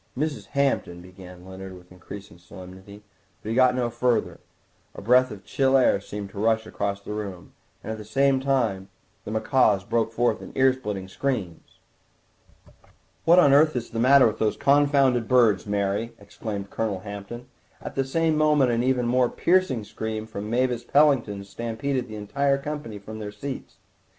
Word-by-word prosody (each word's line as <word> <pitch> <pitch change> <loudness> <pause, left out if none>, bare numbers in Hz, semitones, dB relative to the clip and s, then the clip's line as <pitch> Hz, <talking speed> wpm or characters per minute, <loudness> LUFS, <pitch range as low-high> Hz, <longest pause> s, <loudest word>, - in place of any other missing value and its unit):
"Mrs. 150 +1 -3
Hampton—" 135 -10 0
began 90 -1 -13
Leonard 95 0 -9
with 90 0 -18
increased 95 +2 -11
solemnity, 95 +3 -13 0.4
but 110 - -6
he - - -1
got 130 0 +4
no 120 -2 -1
further. 120 0 0 0.6
A - - -8
breath 125 +4 +4
of 105 -4 -10
chill 135 0 +2
air 125 -6 +3
seemed 100 0 -7
to 100 - -8
rush 110 +1 +1
across 100 -2 -3
the 105 - -6
room, 100 -4 -7 0.3
and - - -5
at 110 - -5
the - - -7
same 135 +5 +2
time 120 -8 -1 0.4
the - - -6
macaws 110 -2 +2
broke 115 +2 0
forth 120 +1 0
into - - -11
ear 130 0 +5
splitting 105 -7 -5
screams. 100 -6 -4 1.5
"What 170 +2 +6
on 145 -6 +6
earth 155 +1 +5
is 120 -1 -4
the 115 - -3
matter 135 +3 +6
with 110 -1 0
those 110 -1 0
confounded 140 -4 +3
birds, 115 -7 +3
Mary?" 100 +3 -1
exclaimed 100 0 -7
Colonel 105 -4 -2
Hampton; 100 +4 -8 0.3
at - - -8
the 135 - 0
same 160 +4 0
moment 150 -4 +3
an 115 0 +1
even 125 -1 +1
more 125 0 +2
piercing 175 - +1
scream 110 +1 -5
from 105 -1 -7
Mavis 125 0 0
Pellington 125 -8 +2
stampeded 120 +5 -3
the 110 - -8
entire 140 +7 0
company 140 -6 -6
from 110 +2 -9
their 105 -1 -6
seats. 130 +6 -7
115 Hz, 170 wpm, -25 LUFS, 100-130 Hz, 1.5 s, What